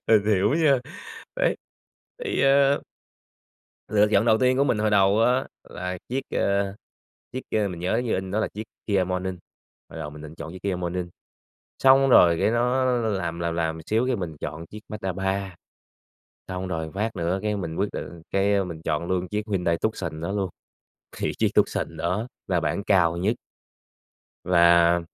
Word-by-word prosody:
Mình 110 Hz, -3 st, +5 dB
hiểu 105 Hz, +4 st, +3 dB
nha. 150 Hz, -5 st, +4 dB, 0.6 s
Đấy, -, -, +2 dB, 0.7 s
thì 415 Hz, -, 0 dB
ờ 140 Hz, +1 st, +4 dB, 1.1 s
Lựa 105 Hz, 0 st, +4 dB
chọn 100 Hz, +3 st, +4 dB
đầu 110 Hz, -2 st, +4 dB
tiên 130 Hz, +1 st, +3 dB
của 140 Hz, -, +3 dB
mình 115 Hz, -, +1 dB
hồi 105 Hz, 0 st, +1 dB
đầu 100 Hz, +1 st, +4 dB
á 125 Hz, +3 st, +3 dB, 0.2 s
là 90 Hz, 0 st, -5 dB
chiếc, 130 Hz, +3 st, -1 dB
ờ, 100 Hz, 0 st, 0 dB, 0.6 s
chiếc 130 Hz, -, -3 dB, 0.2 s
ơ, 105 Hz, -2 st, +1 dB
mình 85 Hz, -2 st, -7 dB
nhớ 95 Hz, +5 st, 0 dB
như 115 Hz, -, 0 dB
in 95 Hz, 0 st, -3 dB
đó 105 Hz, +2 st, 0 dB
là -, -, 0 dB
chiếc 105 Hz, -, -6 dB, 0.2 s
KIA 100 Hz, -3 st, +2 dB
Morning, 90 Hz, 0 st, -3 dB, 0.5 s
hồi -, -, -9 dB
đầu 75 Hz, -, -5 dB
mình 75 Hz, 0 st, -11 dB
định 75 Hz, +1 st, -9 dB
chọn 80 Hz, -, -8 dB
chiếc 95 Hz, -, -10 dB
KIA 100 Hz, -2 st, -1 dB
Morning. 90 Hz, 0 st, -3 dB, 0.7 s
Xong 135 Hz, +1 st, +6 dB
rồi 85 Hz, -7 st, +7 dB
cái -, -, +3 dB
nó 125 Hz, +3 st, +2 dB, 0.2 s
làm 95 Hz, -7 st, -2 dB
làm 85 Hz, -1 st, -1 dB
làm 80 Hz, -1 st, -1 dB
xíu 115 Hz, +4 st, +1 dB
cái 130 Hz, -2 st, +1 dB
mình 85 Hz, -5 st, -5 dB
chọn 80 Hz, +3 st, -5 dB
chiếc 105 Hz, +4 st, -10 dB
Mazda 105 Hz, -4 st, -4 dB
3. 95 Hz, 0 st, -2 dB, 0.9 s
Xong 95 Hz, 0 st, -4 dB
rồi 80 Hz, -3 st, -3 dB
phát 110 Hz, +3 st, -2 dB
nữa 85 Hz, +3 st, 0 dB
cái 105 Hz, -1 st, 0 dB
mình 80 Hz, -4 st, -4 dB
quyết 100 Hz, -, 0 dB
định 85 Hz, -1 st, -7 dB
cái 100 Hz, 0 st, +2 dB
mình 85 Hz, -3 st, -7 dB
chọn 80 Hz, +1 st, -1 dB
luôn 90 Hz, -1 st, -1 dB
chiếc 105 Hz, +2 st, -2 dB
Hyundai 90 Hz, -4 st, +1 dB
Tucson 85 Hz, -8 st, -3 dB
đó 85 Hz, +4 st, -3 dB
luôn, 100 Hz, -3 st, -1 dB, 0.7 s
thì -, -, -1 dB
chiếc -, -, +3 dB
Tucson 80 Hz, -, +1 dB
đó 90 Hz, +8 st, -1 dB, 0.2 s
là 90 Hz, -3 st, +2 dB
bản 80 Hz, +6 st, -1 dB
cao 85 Hz, -4 st, +3 dB
nhất. 105 Hz, +7 st, +1 dB, 1.1 s
Và 85 Hz, -1 st, +5 dB
95 Hz, 185 wpm, -25 LUFS, 85-110 Hz, 1.1 s, rồi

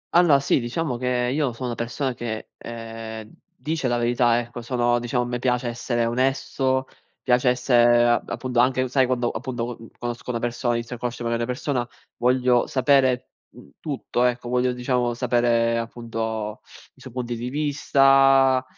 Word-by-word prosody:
Allora 165 Hz, -6 st, +6 dB
sì, 135 Hz, -, +2 dB
diciamo 125 Hz, +2 st, -2 dB
che 125 Hz, 0 st, 0 dB
io 140 Hz, -5 st, 0 dB
sono 125 Hz, +2 st, -5 dB
una 120 Hz, -, -3 dB
persona 125 Hz, +3 st, -2 dB
che, 110 Hz, -2 st, -5 dB
ehm, 115 Hz, -1 st, -8 dB, 0.2 s
dice 155 Hz, -3 st, -2 dB
la 120 Hz, 0 st, +1 dB
verità, 120 Hz, 0 st, +2 dB
ecco, 120 Hz, 0 st, -7 dB
sono 120 Hz, 0 st, +1 dB
diciamo 120 Hz, +1 st, -1 dB
a -, -, -4 dB
me 120 Hz, 0 st, -3 dB
piace 125 Hz, 0 st, 0 dB
essere 120 Hz, 0 st, -1 dB
onesto, 130 Hz, +1 st, 0 dB, 0.4 s
piace 125 Hz, 0 st, +3 dB
essere 120 Hz, -1 st, +4 dB
a 120 Hz, -, +2 dB
appunto 125 Hz, -2 st, -2 dB
anche, 130 Hz, +1 st, +2 dB
sai 130 Hz, 0 st, +3 dB
quando 125 Hz, -1 st, 0 dB
appunto 120 Hz, 0 st, -4 dB
co 115 Hz, -, -14 dB
conosco 120 Hz, 0 st, -6 dB
una 120 Hz, -, -1 dB
persona, 120 Hz, 0 st, -1 dB
inizio 115 Hz, +1 st, -4 dB
a -, -, -24 dB
conoscere 120 Hz, 0 st, -4 dB
magari 115 Hz, 0 st, 0 dB
una 125 Hz, -, -3 dB
persona, 125 Hz, -2 st, -2 dB, 0.3 s
voglio 125 Hz, 0 st, +2 dB
sapere, 130 Hz, -2 st, +2 dB, 0.3 s
mhmm, -, -, -15 dB
tutto, 135 Hz, -4 st, -2 dB
ecco, 125 Hz, 0 st, -1 dB
voglio 125 Hz, 0 st, +1 dB
diciamo 125 Hz, -1 st, -1 dB
sapere 120 Hz, -1 st, +2 dB
appunto 115 Hz, -2 st, -4 dB, 0.3 s
i -, -, -23 dB
suoi -, -, -10 dB
punti 120 Hz, -1 st, -3 dB
di 120 Hz, +2 st, -4 dB
vista, 135 Hz, -2 st, +4 dB
125 Hz, 170 wpm, -23 LUFS, 120-130 Hz, 0.4 s, Allora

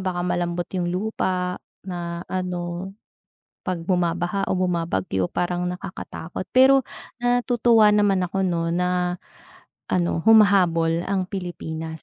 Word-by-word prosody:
baka 180 Hz, -2 st, -2 dB
malambot 175 Hz, 0 st, -1 dB
yung 180 Hz, -2 st, -1 dB
lupa, 180 Hz, -1 st, -2 dB, 0.2 s
na 175 Hz, -2 st, -5 dB
ano, 180 Hz, 0 st, -4 dB, 0.7 s
'pag 175 Hz, -3 st, -4 dB
bumabaha 180 Hz, +1 st, 0 dB
o 185 Hz, -, +1 dB
bumabagyo, 165 Hz, -, -1 dB
parang 180 Hz, 0 st, -1 dB
nakakatakot. 180 Hz, -2 st, -7 dB
Pero, 265 Hz, +1 st, +6 dB, 0.4 s
natutuwa 240 Hz, -3 st, +4 dB
naman 200 Hz, -3 st, +3 dB
ako, 195 Hz, +2 st, -2 dB
'no, 170 Hz, -2 st, 0 dB
na 180 Hz, 0 st, 0 dB, 0.7 s
ano, 175 Hz, -2 st, 0 dB
humahabol 180 Hz, -6 st, +4 dB
ang 195 Hz, -1 st, 0 dB
Pilipinas 160 Hz, -4 st, -5 dB
180 Hz, 110 wpm, -23 LUFS, 175-195 Hz, 0.7 s, Pero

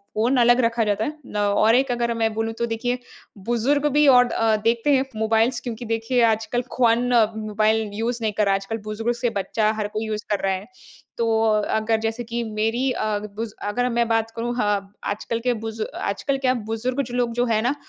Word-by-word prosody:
Phone 240 Hz, +5 st, +2 dB
अलग 240 Hz, +1 st, +5 dB
रखा 230 Hz, 0 st, +1 dB
जाता 210 Hz, 0 st, 0 dB
है। 305 Hz, +1 st, -5 dB
ल 210 Hz, -, -6 dB
और 205 Hz, +2 st, +3 dB
एक 265 Hz, 0 st, +2 dB
अगर 235 Hz, -1 st, 0 dB
मैं 225 Hz, -1 st, +1 dB
बोलूँ 225 Hz, +1 st, -2 dB
तो 235 Hz, -, +1 dB
देखिए 235 Hz, +2 st, -2 dB, 0.5 s
बुज़ुर्ग 260 Hz, +5 st, +1 dB
भी 295 Hz, 0 st, +4 dB
और 250 Hz, -2 st, +7 dB
अ, 225 Hz, -1 st, +2 dB
देखते 230 Hz, +5 st, +2 dB
हैं 265 Hz, 0 st, +2 dB
मोबाइल्स 225 Hz, +3 st, +1 dB
क्योंकि 240 Hz, -1 st, -6 dB
देखिए 225 Hz, +2 st, 0 dB
आजकल 225 Hz, +2 st, 0 dB
ख्वान 240 Hz, 0 st, +3 dB, 0.3 s
मोबाइल 215 Hz, 0 st, 0 dB
यूज़ 230 Hz, +3 st, -2 dB
नहीं 215 Hz, -2 st, -1 dB
कर 210 Hz, -, +3 dB
रहा 195 Hz, -, +3 dB
है। 195 Hz, -, +1 dB
आजकल 195 Hz, +3 st, -5 dB
बुज़ुर्ग 220 Hz, +3 st, -2 dB
से 240 Hz, 0 st, 0 dB
बच्चा 215 Hz, +2 st, 0 dB
हर 210 Hz, -, -1 dB
कोई 215 Hz, +1 st, -4 dB
यूज़ 215 Hz, 0 st, -3 dB
कर 205 Hz, -, +1 dB
रहा 195 Hz, -, +2 dB
है। 190 Hz, +2 st, -5 dB, 0.5 s
तो 230 Hz, -, 0 dB, 0.4 s
अगर 220 Hz, 0 st, +1 dB
जैसे 225 Hz, +2 st, -2 dB
कि 235 Hz, +1 st, -3 dB
मेरी 225 Hz, +4 st, -1 dB
अ, 215 Hz, -3 st, -1 dB, 0.2 s
बुज़ 225 Hz, 0 st, -4 dB
अगर 245 Hz, +4 st, 0 dB
मैं 235 Hz, -1 st, +1 dB
बात 225 Hz, 0 st, 0 dB
करूँ 235 Hz, +1 st, -2 dB
ह -, -, +2 dB, 0.4 s
आजकल 225 Hz, +2 st, -2 dB
के 245 Hz, +1 st, 0 dB
बुज़ु 225 Hz, -1 st, -4 dB, 0.2 s
आजकल 270 Hz, +7 st, -1 dB
क्या 260 Hz, -1 st, +1 dB
बुज़ुर्ग 245 Hz, +5 st, -2 dB
जो 245 Hz, -, -9 dB
लोग 240 Hz, -1 st, +1 dB
जो 245 Hz, +1 st, +1 dB
है 225 Hz, -2 st, +1 dB
ना 250 Hz, +5 st, 0 dB
225 Hz, 210 wpm, -23 LUFS, 215-240 Hz, 0.5 s, और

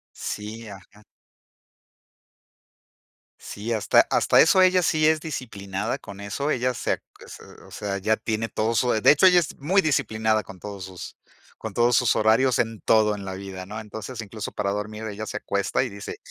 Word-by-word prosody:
Sí, 110 Hz, +2 st, -6 dB
ajá. 100 Hz, +1 st, -14 dB, 2.4 s
Sí, 110 Hz, +3 st, -5 dB
hasta 110 Hz, -2 st, +4 dB
hasta -, -, +3 dB
eso 190 Hz, -, +4 dB
ella 185 Hz, 0 st, +5 dB
sí 155 Hz, -2 st, +2 dB
es 160 Hz, 0 st, +4 dB
disciplinada 105 Hz, -, -4 dB
con 100 Hz, -1 st, -11 dB
eso. 120 Hz, +9 st, -3 dB
Ella 125 Hz, -2 st, 0 dB
se -, -, -1 dB
ac -, -, -3 dB, 0.2 s
se -, -, -11 dB, 0.2 s
o -, -, -16 dB
sea, 100 Hz, -1 st, -4 dB
ya 110 Hz, +3 st, +1 dB
tiene 110 Hz, 0 st, -3 dB
todo 110 Hz, +2 st, -1 dB
su 125 Hz, +3 st, +2 dB
De 110 Hz, -, +4 dB
hecho, 150 Hz, +5 st, +4 dB
ella 180 Hz, -1 st, +7 dB
es 160 Hz, -, -5 dB
muy 180 Hz, +8 st, +3 dB
disciplinada 110 Hz, -, +1 dB
con 95 Hz, -1 st, -13 dB
todos 100 Hz, -1 st, -7 dB
sus 95 Hz, -1 st, -9 dB, 0.4 s
con 110 Hz, -, -7 dB
todos 120 Hz, +2 st, +3 dB
sus 125 Hz, -3 st, +3 dB
horarios 115 Hz, +4 st, +3 dB
en 115 Hz, -2 st, -1 dB
todo 110 Hz, -1 st, +3 dB
en 100 Hz, -1 st, -7 dB
la 95 Hz, -1 st, -5 dB
vida, 95 Hz, -1 st, -7 dB
¿no? 105 Hz, +3 st, -6 dB
Entonces, 110 Hz, +3 st, -7 dB
incluso 110 Hz, 0 st, -7 dB
para 100 Hz, -1 st, -2 dB
dormir, 105 Hz, +2 st, -5 dB
ella 110 Hz, 0 st, -5 dB
se -, -, -5 dB
acuesta 100 Hz, +4 st, -1 dB
y 130 Hz, -, -1 dB
dice: 100 Hz, -2 st, -8 dB
110 Hz, 185 wpm, -24 LUFS, 100-125 Hz, 2.4 s, ella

